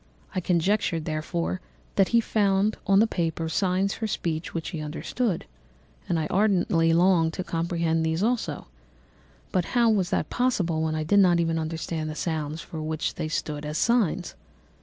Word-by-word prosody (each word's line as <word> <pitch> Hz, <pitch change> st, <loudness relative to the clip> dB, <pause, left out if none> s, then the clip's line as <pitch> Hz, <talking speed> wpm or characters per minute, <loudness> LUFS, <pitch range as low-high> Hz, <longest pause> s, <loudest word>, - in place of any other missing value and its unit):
I 185 Hz, -, 0 dB
conjectured, 175 Hz, -2 st, +1 dB
therefore, 90 Hz, -, -2 dB, 0.3 s
that 195 Hz, -, +3 dB
he 235 Hz, -, +4 dB
found 205 Hz, -1 st, +2 dB
on 195 Hz, -, +5 dB
the 220 Hz, -, +6 dB
paper 165 Hz, -5 st, -2 dB
signs 190 Hz, +3 st, +1 dB
for 220 Hz, -, -3 dB
speech 165 Hz, -5 st, -3 dB
which 165 Hz, -1 st, -4 dB
he 165 Hz, -5 st, -5 dB
understood, 170 Hz, +7 st, -2 dB, 0.6 s
and 170 Hz, -, +2 dB
I 155 Hz, -, -1 dB
ardently 180 Hz, -5 st, +3 dB
longed 170 Hz, -1 st, +4 dB
to 185 Hz, -, -3 dB
comprehend 165 Hz, -1 st, 0 dB
these 160 Hz, +3 st, 0 dB
also; 240 Hz, +1 st, -1 dB, 0.9 s
but 185 Hz, -, +2 dB
how 235 Hz, -2 st, +5 dB
was 190 Hz, -5 st, +1 dB
that -, -, -1 dB
possible 185 Hz, -11 st, +1 dB
when 160 Hz, 0 st, 0 dB
I 155 Hz, -, -1 dB
did 200 Hz, +6 st, +4 dB
not 175 Hz, -3 st, +5 dB
even 165 Hz, -1 st, +1 dB
understand 160 Hz, 0 st, -3 dB
the 155 Hz, -, -5 dB
sounds 155 Hz, -1 st, -3 dB
for 160 Hz, -, -7 dB
which 155 Hz, 0 st, -2 dB
they -, -, -3 dB
stood 150 Hz, -1 st, -3 dB
as 150 Hz, +1 st, -3 dB
signs? 210 Hz, -7 st, +1 dB
170 Hz, 170 wpm, -26 LUFS, 160-195 Hz, 0.9 s, the